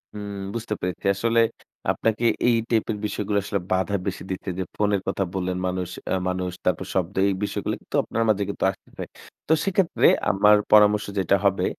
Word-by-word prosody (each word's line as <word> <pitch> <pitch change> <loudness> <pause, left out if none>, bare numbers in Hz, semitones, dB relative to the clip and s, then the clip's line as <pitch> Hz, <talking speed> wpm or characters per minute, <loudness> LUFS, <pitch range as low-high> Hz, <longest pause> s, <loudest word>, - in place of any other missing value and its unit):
হুম 100 -1 -6 0.2
বুঝতে 115 -2 -3
পেরেছি। 90 -1 -4
আসলে 115 +4 +1 0.5
আপনাকে 115 +1 0 0.2
এই 120 - +5
টাইপের 110 -2 0
বিষয়গুলো 105 0 -1
আসলে 100 0 -2
বাধা 95 +2 +1
বেশি 95 -1 -3
দিচ্ছে, 95 +1 -4
যে - - 0
ফোনের 105 -2 +1
কথা 95 0 0
বললেন 95 -1 -2
মানুষ 90 -1 -2 0.2
আ - - +2 0.2
মানুষ 90 0 -2
তারপর 90 +1 0
শব্দ 95 +1 -1
এই - - +1
বিষয়গুলো 105 - -2
কিন্তু - - -8
আপনার 115 0 -1
মাঝে 105 -1 +2
কিন্তু - - -4
আসতেছে। 95 - -11 0.4
তো 160 - +4
সেক্ষেত্রে 190 -2 +2 0.2
আমার 105 +2 +5 0.2
পরামর্শ 105 0 +6
যেটা 95 +1 +3
হবে, 100 -1 +2
100 Hz, 175 wpm, -24 LUFS, 95-105 Hz, 0.5 s, পরামর্শ